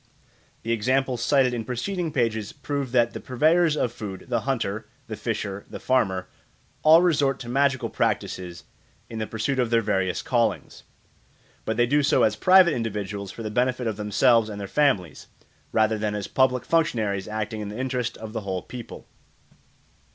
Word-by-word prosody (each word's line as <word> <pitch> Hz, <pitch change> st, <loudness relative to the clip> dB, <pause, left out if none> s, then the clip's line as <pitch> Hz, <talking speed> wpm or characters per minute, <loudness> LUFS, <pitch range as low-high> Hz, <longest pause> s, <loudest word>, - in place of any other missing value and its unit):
The 115 Hz, -, -2 dB
examples 125 Hz, +2 st, 0 dB
cited 130 Hz, -2 st, +3 dB
in 115 Hz, -2 st, -2 dB
preceding 165 Hz, -, -3 dB
pages 110 Hz, -5 st, -1 dB
prove 140 Hz, -2 st, -4 dB
that 120 Hz, -2 st, +2 dB
the -, -, -5 dB
purveyors 155 Hz, +5 st, +2 dB
of 120 Hz, -, 0 dB
food 100 Hz, -5 st, -7 dB
the 120 Hz, -, +1 dB
hunter, 110 Hz, -4 st, -2 dB, 0.2 s
the 110 Hz, -3 st, -6 dB
fisher, 105 Hz, -2 st, -4 dB
the -, -, -7 dB
farmer 95 Hz, -8 st, 0 dB, 0.5 s
all 160 Hz, +3 st, +7 dB
resort 140 Hz, -6 st, +2 dB
to 120 Hz, -, -8 dB
magical 135 Hz, +1 st, +1 dB
practices 90 Hz, -2 st, -2 dB, 0.5 s
in 115 Hz, -, -5 dB
the 110 Hz, -, -3 dB
pursuit 115 Hz, +5 st, -2 dB
of 120 Hz, -2 st, +1 dB
their 115 Hz, -1 st, +2 dB
various 95 Hz, -2 st, 0 dB
callings; 120 Hz, -3 st, -1 dB, 0.8 s
but 110 Hz, -, -2 dB
they 120 Hz, -, +4 dB
do 145 Hz, +4 st, +2 dB
so 140 Hz, -, +3 dB
as 110 Hz, -, +3 dB
private 185 Hz, -, +6 dB
individuals 105 Hz, -4 st, -4 dB
for 115 Hz, -, -8 dB
the 110 Hz, -, -4 dB
benefit 125 Hz, +2 st, 0 dB
of 110 Hz, -3 st, -2 dB
themselves 110 Hz, +2 st, +3 dB
and 105 Hz, -1 st, -6 dB
their 100 Hz, -, -5 dB
families, 100 Hz, -, 0 dB, 0.4 s
rather 110 Hz, 0 st, +2 dB
than 105 Hz, -1 st, -1 dB
as 100 Hz, -2 st, -4 dB
public 130 Hz, -1 st, +1 dB
functionaries 110 Hz, -12 st, 0 dB
acting 110 Hz, 0 st, -4 dB
in 105 Hz, -, -5 dB
the 105 Hz, -, -7 dB
interest 125 Hz, -2 st, -2 dB
of 110 Hz, 0 st, -8 dB
the 110 Hz, -, -3 dB
whole 95 Hz, -2 st, -4 dB
people. 120 Hz, -2 st, -9 dB
115 Hz, 175 wpm, -25 LUFS, 105-130 Hz, 0.8 s, all